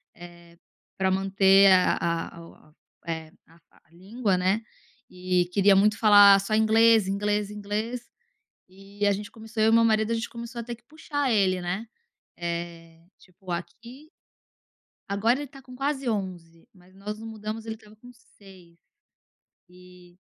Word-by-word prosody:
eh, 170 Hz, -1 st, -15 dB, 0.4 s
pra 190 Hz, 0 st, +1 dB
manter 195 Hz, 0 st, +4 dB
a 185 Hz, -1 st, +4 dB
a 170 Hz, 0 st, -3 dB
a -, -, -10 dB
o -, -, -16 dB
a 155 Hz, -, -24 dB, 0.3 s
é 160 Hz, -1 st, -5 dB, 0.2 s
a 165 Hz, +1 st, -22 dB, 0.3 s
a 165 Hz, -, -33 dB
língua, 195 Hz, +3 st, -2 dB
né 190 Hz, +4 st, 0 dB, 0.5 s
e 180 Hz, -1 st, 0 dB
queria 200 Hz, 0 st, +4 dB
muito 210 Hz, +2 st, +3 dB
falar 205 Hz, -2 st, +7 dB
só 205 Hz, +2 st, -4 dB
inglês, 220 Hz, -1 st, +4 dB
inglês, 205 Hz, +1 st, -1 dB
inglês, 210 Hz, +4 st, -5 dB, 0.6 s
e 195 Hz, +2 st, -5 dB
a 205 Hz, -, +4 dB
gente 205 Hz, +2 st, -6 dB
começou 225 Hz, 0 st, -5 dB
eu 220 Hz, -, +4 dB
e -, -, +4 dB
meu 230 Hz, 0 st, +5 dB
marido 220 Hz, -1 st, +1 dB
a -, -, +1 dB
gente 230 Hz, 0 st, -3 dB
começou 235 Hz, +1 st, -8 dB
a -, -, -7 dB
ter 240 Hz, +1 st, -6 dB
que 240 Hz, -, -31 dB
puxar 290 Hz, -1 st, -3 dB
ele, 190 Hz, -4 st, +2 dB
né. 180 Hz, +6 st, -4 dB, 0.5 s
Eh, 170 Hz, -1 st, -6 dB, 0.2 s
tipo 185 Hz, 0 st, -15 dB
aqui 235 Hz, -, -8 dB, 1.0 s
agora 220 Hz, +6 st, +1 dB
ele 290 Hz, -, -5 dB
tá 270 Hz, +1 st, -15 dB
com 255 Hz, 0 st, -14 dB
quase 275 Hz, -1 st, -2 dB
11, 180 Hz, -6 st, -5 dB
mas 185 Hz, 0 st, -22 dB
nós 210 Hz, +2 st, -7 dB
nos 225 Hz, +1 st, -9 dB
mudamos 220 Hz, 0 st, -7 dB
ele 220 Hz, -, -4 dB
estava 215 Hz, -1 st, -19 dB
com 245 Hz, +3 st, -15 dB
6. 190 Hz, -7 st, -19 dB, 0.9 s
E, 180 Hz, 0 st, -18 dB
200 Hz, 165 wpm, -25 LUFS, 180-225 Hz, 1.0 s, falar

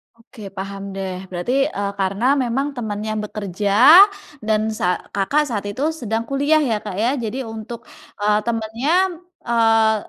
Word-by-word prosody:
Oke 230 Hz, -1 st, -16 dB, 0.2 s
paham 195 Hz, +1 st, -5 dB
deh, 190 Hz, -1 st, -4 dB, 0.2 s
berarti, 180 Hz, +7 st, -3 dB, 0.2 s
eee, 200 Hz, 0 st, -1 dB
karena 195 Hz, +4 st, -1 dB, 0.2 s
memang 265 Hz, +4 st, -1 dB
temannya 215 Hz, -2 st, -4 dB
bekerja 205 Hz, -1 st, -4 dB, 0.8 s
dan 215 Hz, -1 st, +2 dB, 0.2 s
sa 180 Hz, 0 st, +1 dB, 0.2 s
Kakak, 275 Hz, +10 st, +1 dB
saat 205 Hz, -3 st, -3 dB
itu 255 Hz, +8 st, -4 dB, 0.2 s
sedang 225 Hz, -1 st, -2 dB
kuliah 285 Hz, +3 st, +2 dB
ya, 230 Hz, -5 st, 0 dB
Kak, 205 Hz, -3 st, -6 dB
ya, 240 Hz, -, +3 dB
jadi 255 Hz, +5 st, -3 dB
untuk, 225 Hz, +1 st, -8 dB, 0.4 s
eee, 210 Hz, 0 st, +3 dB
temannya, 230 Hz, +5 st, -2 dB, 0.5 s
eee, 225 Hz, -2 st, +3 dB
220 Hz, 145 wpm, -20 LUFS, 205-235 Hz, 0.8 s, ya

